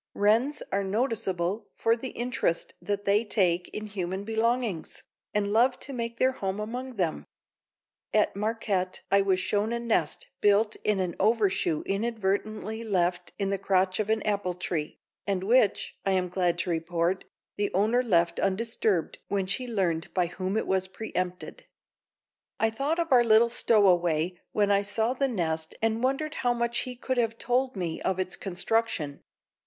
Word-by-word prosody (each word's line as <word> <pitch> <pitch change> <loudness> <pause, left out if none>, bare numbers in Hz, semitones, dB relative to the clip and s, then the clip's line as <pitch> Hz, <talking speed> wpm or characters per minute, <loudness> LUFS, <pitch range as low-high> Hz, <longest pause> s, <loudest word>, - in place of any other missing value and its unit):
Wrens 230 +8 +2
are 200 +1 +1
noticeable 200 -3 -1
for 225 0 +2
the 255 +2 -5
interest 240 -9 -1
that 205 0 -3
they 205 +3 +3
take 180 -5 +1
in 215 - -5
human 190 -2 -3
belongings, 225 -3 -1 0.3
and 205 0 0
love 245 +3 +4
to 275 - -4
make 235 -1 -4
their 260 - +3
home 195 -5 -3
among 245 +4 -5
them. 175 -6 -1 0.9
At 210 -2 +2
Marquette 200 -3 -1
I 200 0 +6
was 190 -1 +2
shown 205 +3 0
a 235 - -1
nest 235 - 0 0.2
built 210 +2 +3
in 210 -2 0
an 180 -2 -1
overshoe 200 -7 +2
inadvertently 215 +1 -2
left 180 -4 0
in 195 -1 -1
the 195 - -1
crotch 185 0 +1
of 215 0 -1
an 220 -1 +1
apple 200 -4 -1
tree, 170 -4 -3 0.3
and 190 -2 0
which, 220 0 +3
I 195 - +1
am 180 -1 +1
glad 180 -1 +1
to 175 - -2
report, 170 +2 -1 0.3
the 205 0 -1
owner 220 +6 +3
left 170 -8 +2
undisturbed 195 -3 0
when 200 -2 0
she 200 +7 -2
learned 180 -8 -1
by 180 -2 +3
whom 185 +4 -3
it - - 0
was 190 0 0
pre 215 +3 -8
empted. 180 - -3 0.9
I 225 0 +2
thought 280 +8 -1
of 335 -3 -1
our 245 -2 +7
little 230 +1 +5
stowaway 180 -7 +2
when 205 -1 +2
I 200 0 +4
saw 220 +4 0
the 275 +1 +1
nest 160 -8 -2
and 225 +1 0
wondered 275 +4 0
how 245 -1 +2
much 235 0 0
he 250 -1 -3
could 255 +1 -2
have 230 -1 0
told 255 +1 0
me 175 -4 -3
of 190 - 0
its 185 -1 -2
construction. 190 -5 -1
205 Hz, 170 wpm, -28 LUFS, 185-230 Hz, 0.9 s, our